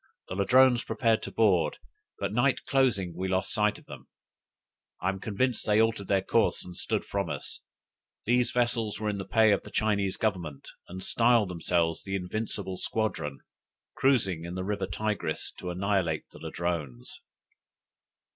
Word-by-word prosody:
The 90 - -4
Ladrones 125 +5 +5
prepared 110 0 +1
to - - -6
board; 95 -8 +2 0.4
but 100 0 -3
night 125 +4 +2
closing 110 -10 +1
we 95 +2 -2
lost 95 0 0
sight 105 0 +2
of - - -17
them: - - -11 0.9
I 90 - 0
am 95 0 -3
convinced 115 +5 0
they 105 0 +4
altered 110 -3 +1
their 95 -1 +2
course - - +1
and 90 -1 -9
stood - - -2
from 100 -4 -2
us. - - -4 0.7
These 120 +2 +3
vessels 120 -4 0
were 110 -1 -1
in 100 -1 -3
the 95 - -4
pay 110 -2 +4
of 100 - +2
the - - -11
Chinese 100 -3 0
Government, 90 -10 -2 0.2
and 95 +1 -7
styled 115 -3 +3
themselves 85 -1 0
the 95 0 -3
Invincible 95 0 -3
Squadron, 95 -10 -2 0.5
cruising 100 -11 +2
in 85 +1 -6
the 95 - -3
river 100 -1 -2
Tigris 100 -4 -2
to 90 - -5
annihilate 90 -3 0
the - - -13
Ladrones! 80 -6 -4
100 Hz, 160 wpm, -28 LUFS, 90-110 Hz, 0.9 s, Ladrones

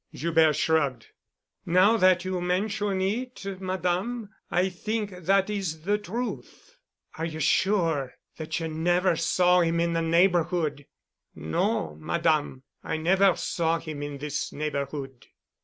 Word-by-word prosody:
Joubert 160 -2 +3
shrugged. 145 -7 0 0.5
"Now 185 +6 +4
that 185 -4 +4
you 185 -1 -2
mention 195 +2 -1
it, 230 +4 -3 0.2
Madame, 190 +5 -2 0.2
I 180 +2 +2
think 210 +3 -3
that 190 +2 +1
is 190 -7 -3
the 205 +3 +1
truth." 240 - -6 0.4
"Are 165 - -1
you 160 -1 -5
sure 165 -8 +1 0.2
that 160 +1 -3
you 165 - -3
never 175 +3 +1
saw 180 +2 +3
him 170 -1 +1
in 170 0 +1
the 165 - +1
neighborhood?" 165 -3 +1 0.5
"No, 80 0 -1
Madame. 130 - 0 0.2
I 160 - -2
never 190 +3 +3
saw 165 -1 0
him 155 -3 -7
in 145 -1 -5
this 145 +1 -4
neighborhood." 140 -3 -5
170 Hz, 130 wpm, -26 LUFS, 155-190 Hz, 0.5 s, Now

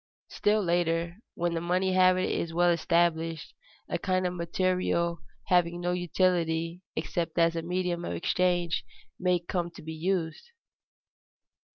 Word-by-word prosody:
Still 210 0 +1
later, 170 0 0 0.2
when 175 0 -1
the 165 - -2
money 185 +2 +1
habit 185 0 +4
is 165 -1 -2
well 175 0 +4
established, 165 -1 0 0.3
a - - -2
kind 185 -1 0
of 180 - 0
material 170 -1 0 0.3
having 175 -2 +2
no 175 0 -1
utility 175 -1 0
except 170 0 -3
as 165 0 +3
a 165 - -1
medium 180 0 -2
of - - -3
exchange 175 -1 +1 0.4
may 180 -1 +2
come 175 0 -3
to 170 - -13
be 160 +1 -6
used. 170 - -2
175 Hz, 140 wpm, -28 LUFS, 170-180 Hz, 0.4 s, habit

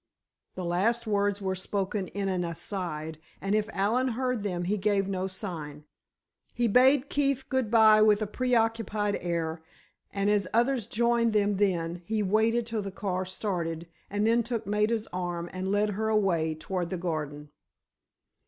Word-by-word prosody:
The 185 - -4
last 220 +8 +1
words 205 -1 0
were 190 0 0
spoken 190 +1 -2
in 200 +1 -3
an 185 -2 0
aside, 165 -2 -4 0.2
and 195 +1 -1
if 215 0 +1
Allen 230 +7 +1
heard 250 -1 -1
them 180 -4 -2
he 190 +4 0
gave 200 -1 +1
no 190 -1 -2
sign. 165 -7 -6 0.7
He 240 -1 +2
bade 260 +5 +5
Keefe 275 -2 0
good 260 -4 0
bye 220 -1 +6
with 210 -1 +5
a 215 - -1
preoccupied 225 -3 0
air, 165 -2 -2 0.5
and 200 0 -1
as 205 -3 +2
others 240 -1 +2
joined 235 0 +2
them 205 -1 +2
then, 175 -4 0
he 215 +4 -1
waited 220 +4 +2
till 225 -2 -2
the 200 - -4
car 185 -1 -2
started, 175 -4 -3 0.2
and 205 +1 0
then 230 +1 +4
took 230 -1 -3
Maida's 210 +2 0
arm 175 -1 -3
and 185 +1 -3
led 205 +1 +2
her 220 +2 -1
away, 175 -7 +1
toward 175 +2 -3
the 185 - -3
garden. 150 -4 -4
200 Hz, 160 wpm, -28 LUFS, 180-225 Hz, 0.7 s, bye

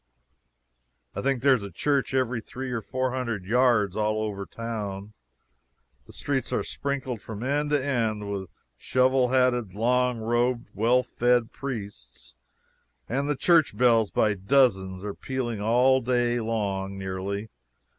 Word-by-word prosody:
I - - -4
think 135 -2 0
there 140 -1 +6
is 120 - -3
a 100 - -6
church 140 - 0
every 125 -2 0
three 130 +3 -6
or 120 -2 -2
four 130 +2 -2
hundred 115 -7 -3
yards 115 -3 +3
all 110 0 0
over 100 -2 -4
town. 105 -3 -5 0.9
The - - -14
streets 135 -2 -2
are - - 0
sprinkled 135 -5 -4
from 110 +2 -7
end 145 +3 0
to 145 -2 +1
end 110 -6 -1
with 95 -2 -4 0.3
shovel 130 0 +2
hatted, 125 -6 +1
long 125 +2 +2
robed, 120 +2 0
well 120 +5 +3
fed 120 -1 +1
priests, 100 - -7 0.7
and 140 +4 -1
the 150 - +1
church 165 +1 +3
bells 115 -4 +4
by 105 -1 +2
dozens 95 -3 +2
are 105 -1 -4
pealing 120 -5 -4
all 125 +4 +4
the 125 +1 -1
day 120 0 +2
long, 100 -4 -2
nearly. 95 +3 -4
120 Hz, 145 wpm, -26 LUFS, 105-130 Hz, 0.9 s, there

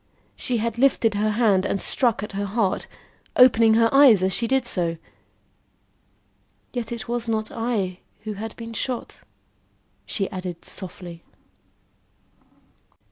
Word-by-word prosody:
She 245 - -2
had 230 +1 -2
lifted 240 -4 +3
her 210 +1 0
hand 210 -4 +2
and 195 - -1
struck 235 -2 0
at 210 - -6
her 200 +1 -3
heart, 200 -1 -1 0.5
opening 230 -3 +6
her 230 0 +5
eyes 265 -9 +7
as 190 0 +1
she 235 - +1
did 265 0 +1
so. 170 -7 -1 1.8
"Yet 240 -3 -4
it 235 -2 -5
was 240 0 -2
not 220 -1 -2
I 210 -6 -2 0.2
who 215 0 -5
had 220 +2 -7
been 230 0 -8
shot," 245 +2 -4 0.9
she 195 -3 -1
added 185 -3 -6
softly. 180 -2 -8
220 Hz, 135 wpm, -23 LUFS, 195-235 Hz, 1.8 s, eyes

